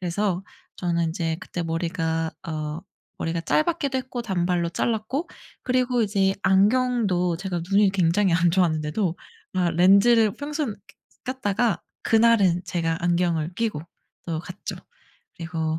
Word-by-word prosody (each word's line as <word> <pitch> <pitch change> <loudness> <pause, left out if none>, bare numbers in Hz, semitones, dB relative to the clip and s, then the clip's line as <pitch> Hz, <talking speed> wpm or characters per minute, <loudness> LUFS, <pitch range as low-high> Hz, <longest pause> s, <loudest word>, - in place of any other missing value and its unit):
그래서 185 +1 -1 0.3
저는 170 -2 0
인제 165 -1 -2
그때 180 -1 -5
머리가 165 -1 -2 0.2
어 155 0 -4 0.4
머리가 165 0 -2
짧았기도 300 - +1
했고 255 -1 -5
단발로 175 -4 0
잘랐고 235 - -2 0.3
그리고 250 -1 +1
이제 195 -2 +1
안경도 200 -4 +2
제가 180 -1 -3
눈이 200 0 +5
굉장히 185 0 +2
안 170 0 +3
좋았는데도 165 +1 +1 0.4
아 180 -2 +2
렌즈를 200 +5 +5
평소는 290 -6 -3 0.5
꼈 255 - -2
꼈다가 225 -2 0 0.2
그날은 220 -6 +4
제가 165 -2 -1
안경을 175 -2 0
끼고 220 -7 -1 0.5
또 165 -2 -2
갔죠. 180 +2 -7 0.6
그리고 160 -1 -2
185 Hz, 290 characters per minute, -24 LUFS, 170-225 Hz, 0.6 s, 눈이